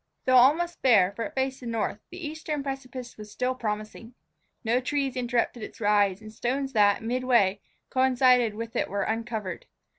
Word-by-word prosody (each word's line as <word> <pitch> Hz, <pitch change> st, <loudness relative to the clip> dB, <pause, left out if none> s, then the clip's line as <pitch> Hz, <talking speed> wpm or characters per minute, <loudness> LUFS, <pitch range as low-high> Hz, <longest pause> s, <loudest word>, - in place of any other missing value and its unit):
Though 255 Hz, 0 st, +5 dB
almost 320 Hz, +7 st, +4 dB
bare, 205 Hz, -8 st, +5 dB
for 225 Hz, +3 st, -4 dB
it -, -, -8 dB
faced 265 Hz, 0 st, -1 dB
the 245 Hz, -, -8 dB
north, 225 Hz, -2 st, -2 dB
the 355 Hz, -1 st, -8 dB
eastern 300 Hz, -1 st, -4 dB
precipice 260 Hz, -3 st, -6 dB
still 250 Hz, +4 st, -1 dB
was 255 Hz, -, -7 dB
promising. 215 Hz, +2 st, -5 dB, 0.5 s
No 235 Hz, +2 st, +2 dB
trees 270 Hz, 0 st, -1 dB
interrupted 240 Hz, -1 st, -1 dB
its -, -, -9 dB
rise, 205 Hz, -2 st, +2 dB
and 215 Hz, 0 st, -10 dB
the -, -, -20 dB
stones 270 Hz, +4 st, -2 dB
that, 205 Hz, -1 st, +3 dB
midway, 235 Hz, -5 st, +2 dB, 0.3 s
coincided 255 Hz, -3 st, +3 dB
with 230 Hz, +1 st, -6 dB
it -, -, 0 dB
were 200 Hz, 0 st, -1 dB
uncovered. 220 Hz, -5 st, -4 dB
245 Hz, 175 wpm, -27 LUFS, 215-265 Hz, 0.5 s, Though